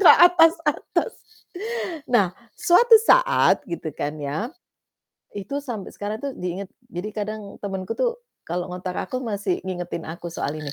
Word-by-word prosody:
ke 375 Hz, -, +8 dB
atas-atas. 335 Hz, +4 st, +4 dB, 0.9 s
Nah, 205 Hz, -7 st, +3 dB, 0.2 s
suatu 360 Hz, +7 st, +5 dB, 0.2 s
saat, -, -, +5 dB
gitu 170 Hz, -2 st, -4 dB
kan 150 Hz, +1 st, -3 dB
ya, 180 Hz, -, -3 dB, 0.8 s
itu 280 Hz, +8 st, -3 dB
sampai 230 Hz, -8 st, -6 dB
sekarang 210 Hz, +2 st, -4 dB
tuh 275 Hz, -, -2 dB
diinget, 180 Hz, +2 st, -4 dB, 0.2 s
jadi 180 Hz, +5 st, -5 dB
kadang 215 Hz, 0 st, -3 dB, 0.2 s
temenku 195 Hz, 0 st, -3 dB
tuh 485 Hz, -1 st, +1 dB, 0.3 s
kalau 175 Hz, +1 st, -1 dB
ngontak 180 Hz, 0 st, -5 dB
aku 255 Hz, -2 st, -3 dB
masih 205 Hz, -5 st, -2 dB
ngingetin 175 Hz, -3 st, -4 dB
aku 170 Hz, +1 st, -6 dB
soal 150 Hz, -1 st, -3 dB
ini, 150 Hz, -2 st, -5 dB
205 Hz, 140 wpm, -24 LUFS, 175-285 Hz, 0.9 s, ke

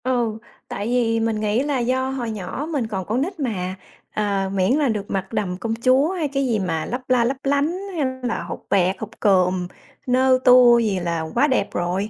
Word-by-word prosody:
Ừ, 240 Hz, -4 st, 0 dB, 0.3 s
tại 205 Hz, -, -4 dB
vì 235 Hz, -2 st, +1 dB
mình 225 Hz, -1 st, 0 dB
nghĩ 215 Hz, +4 st, +1 dB
là 285 Hz, -2 st, -1 dB
do 260 Hz, +2 st, 0 dB
hồi 250 Hz, -4 st, -3 dB
nhỏ 215 Hz, +8 st, -5 dB
mình 270 Hz, -7 st, -1 dB
còn 190 Hz, -4 st, -4 dB
con 230 Hz, +7 st, -1 dB
nít 360 Hz, +4 st, -3 dB
mà, 190 Hz, -9 st, -2 dB, 0.4 s
ờ, 200 Hz, -2 st, -1 dB
miễn 190 Hz, +1 st, +2 dB
là 290 Hz, -4 st, +2 dB
được 210 Hz, -3 st, -2 dB
mặt 195 Hz, +2 st, -3 dB
đầm 185 Hz, -5 st, -2 dB
công 225 Hz, +3 st, -3 dB
chúa 265 Hz, +5 st, +4 dB
hay 345 Hz, -5 st, -1 dB
cái 275 Hz, -1 st, -1 dB
gì 225 Hz, -3 st, +1 dB
mà 165 Hz, -5 st, -2 dB
lấp 250 Hz, +2 st, -4 dB
la 250 Hz, -2 st, +4 dB
lấp 260 Hz, +3 st, -1 dB
lánh 285 Hz, +5 st, +1 dB, 0.2 s
hay 300 Hz, -4 st, 0 dB, 0.2 s
là 240 Hz, -2 st, -2 dB
hột -, -, -8 dB
bẹt, 190 Hz, -1 st, +2 dB
hột 220 Hz, +1 st, -8 dB
cườm, 185 Hz, -3 st, +2 dB, 0.4 s
nơ 255 Hz, +1 st, +3 dB
tua 250 Hz, -1 st, +7 dB
gì 210 Hz, -5 st, 0 dB
là 170 Hz, -2 st, -2 dB
quá 280 Hz, +5 st, +4 dB
đẹp 260 Hz, -, +1 dB
rồi, 180 Hz, +4 st, -1 dB
230 Hz, 215 wpm, -22 LUFS, 195-260 Hz, 0.4 s, tua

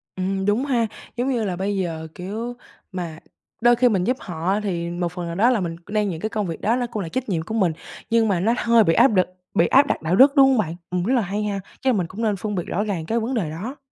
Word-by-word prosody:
Ừm, 190 Hz, +1 st, -2 dB
đúng 215 Hz, +6 st, +1 dB
ha, 240 Hz, -5 st, +1 dB, 0.3 s
giống 250 Hz, +3 st, 0 dB
như 240 Hz, -4 st, 0 dB
là, 185 Hz, -3 st, -2 dB
bây 195 Hz, +2 st, -2 dB
giờ, 165 Hz, -4 st, -3 dB
kiểu, 220 Hz, +7 st, -5 dB, 0.4 s
mà 170 Hz, -4 st, -5 dB, 0.4 s
đôi 240 Hz, 0 st, +6 dB
khi 245 Hz, +1 st, +4 dB
mình 195 Hz, -5 st, +1 dB
giúp 250 Hz, +6 st, 0 dB
họ, 180 Hz, +3 st, -2 dB
thì 170 Hz, -4 st, -2 dB
một 175 Hz, 0 st, -2 dB
phần 180 Hz, -1 st, -5 dB
nào 170 Hz, -, -4 dB
đó 230 Hz, +6 st, +4 dB
là 240 Hz, -4 st, +2 dB
mình 170 Hz, -2 st, -3 dB
c 170 Hz, -, -26 dB
đang 210 Hz, -1 st, 0 dB
những 165 Hz, -2 st, -5 dB
cái 220 Hz, -, -1 dB
công 210 Hz, -3 st, -2 dB
việc 165 Hz, -, -5 dB
đó 225 Hz, +3 st, +2 dB
ló 245 Hz, -1 st, -1 dB
cũng 210 Hz, -4 st, -3 dB
là 165 Hz, -, -6 dB
trách 260 Hz, +2 st, -3 dB
nhiệm 170 Hz, -5 st, 0 dB
của 180 Hz, +7 st, -6 dB
mình, 190 Hz, -7 st, +2 dB, 0.4 s
nhưng 230 Hz, -1 st, +3 dB
mà 195 Hz, -4 st, +1 dB
nó 220 Hz, +6 st, +2 dB
hơi 230 Hz, -1 st, +4 dB
bị 165 Hz, -, +3 dB
áp -, -, +6 dB
đực 185 Hz, -6 st, +2 dB, 0.3 s
bị 170 Hz, -, +3 dB
áp 280 Hz, +2 st, +5 dB
đặt -, -, -1 dB
đạo 160 Hz, +3 st, +1 dB
đức, 275 Hz, +7 st, +6 dB
đúng 270 Hz, -1 st, +7 dB
hông 260 Hz, -, +3 dB
bạn? 170 Hz, -6 st, -1 dB
Ừm, 180 Hz, -1 st, -1 dB
rất 235 Hz, +8 st, +1 dB
là 245 Hz, -, +3 dB
hay 205 Hz, +2 st, -2 dB
ha, 200 Hz, -1 st, -2 dB, 0.2 s
chắc 265 Hz, -, +1 dB
là -, -, +1 dB
mình 175 Hz, -3 st, -1 dB
cũng 210 Hz, +7 st, -7 dB
nên 215 Hz, -3 st, +1 dB
phân 210 Hz, +1 st, -4 dB
biệt 175 Hz, -, -1 dB
rõ 205 Hz, +4 st, -1 dB
ràng 185 Hz, -7 st, -3 dB
cái 230 Hz, +6 st, 0 dB
vấn 235 Hz, +4 st, -2 dB
đề 190 Hz, -10 st, -1 dB
đó. 215 Hz, -, -6 dB
205 Hz, 300 wpm, -22 LUFS, 175-230 Hz, 0.4 s, đúng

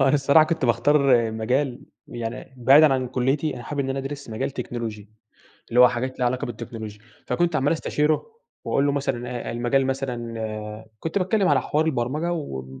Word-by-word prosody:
هو 135 Hz, -, +4 dB
أنا 135 Hz, -, +4 dB
الصراحة 140 Hz, +2 st, +5 dB
كنت 160 Hz, -4 st, -1 dB
باختار 125 Hz, -1 st, +3 dB
مجال 125 Hz, +4 st, -1 dB, 0.3 s
يعني 120 Hz, +2 st, -6 dB
بعيدًا 135 Hz, +4 st, +6 dB
عن 130 Hz, -1 st, -1 dB
كُلّيتي، 135 Hz, +5 st, 0 dB
أنا 120 Hz, -, -8 dB
حابب 145 Hz, +4 st, -3 dB
إن 135 Hz, -1 st, -2 dB
أنا 135 Hz, -, -2 dB
أدرس 140 Hz, -1 st, -6 dB
مجال 110 Hz, +4 st, -2 dB
تكنولوجي، 115 Hz, -5 st, -6 dB, 0.6 s
اللي 120 Hz, -, +2 dB
هو 125 Hz, -, +10 dB
حاجات 130 Hz, +2 st, -3 dB
ليها 125 Hz, -, +2 dB
علاقة 125 Hz, +1 st, 0 dB
بالتكنولوجيا. 110 Hz, -2 st, -7 dB, 0.3 s
فكنت 175 Hz, -2 st, +1 dB
عمّال 145 Hz, +2 st, +2 dB
أستشيره 155 Hz, -, 0 dB, 0.3 s
وأقول 140 Hz, -, +1 dB
له 145 Hz, -, +2 dB
مثلًا 135 Hz, -3 st, -2 dB
إيه، -, -, -3 dB
المجال 120 Hz, +3 st, +1 dB
مثلًا 115 Hz, -5 st, -4 dB
كنت 165 Hz, +5 st, -2 dB
باتكلّم 195 Hz, +1 st, +2 dB
على 140 Hz, -3 st, +3 dB
حوار 155 Hz, +4 st, 0 dB
البرمجة 150 Hz, +5 st, -1 dB
و 65 Hz, -, -5 dB
130 Hz, 180 wpm, -24 LUFS, 120-145 Hz, 0.6 s, هو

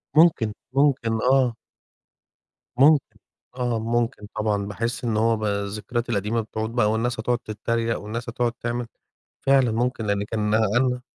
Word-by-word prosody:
ممكن، 150 Hz, -10 st, +4 dB, 0.2 s
ممكن 135 Hz, -6 st, +2 dB
آه. 130 Hz, -2 st, +3 dB, 1.2 s
ممكن، 145 Hz, +2 st, +4 dB, 0.4 s
آه 120 Hz, -2 st, 0 dB
ممكن 115 Hz, -1 st, -1 dB
طبعًا، 105 Hz, -2 st, 0 dB
باحِس 115 Hz, +4 st, -3 dB
إن 115 Hz, -3 st, 0 dB
هو 115 Hz, 0 st, +3 dB
ب 110 Hz, -, -6 dB
الذكريات 105 Hz, +4 st, -2 dB
القديمة 110 Hz, +1 st, 0 dB
بتعود 110 Hz, 0 st, -4 dB
بقى 105 Hz, -3 st, +3 dB
والناس 115 Hz, +2 st, -1 dB
هتقعد 120 Hz, +2 st, +1 dB
تتريق، 115 Hz, +2 st, -2 dB
والناس 115 Hz, +3 st, -5 dB
هتقعد 120 Hz, 0 st, 0 dB
تعمل، 120 Hz, 0 st, -4 dB, 0.5 s
فعلًا 135 Hz, -4 st, +3 dB
ممكن 120 Hz, -1 st, -1 dB
لإن 100 Hz, 0 st, 0 dB
كان 105 Hz, 0 st, -1 dB
أنا 120 Hz, +4 st, +2 dB
115 Hz, 140 wpm, -24 LUFS, 110-125 Hz, 1.2 s, ممكن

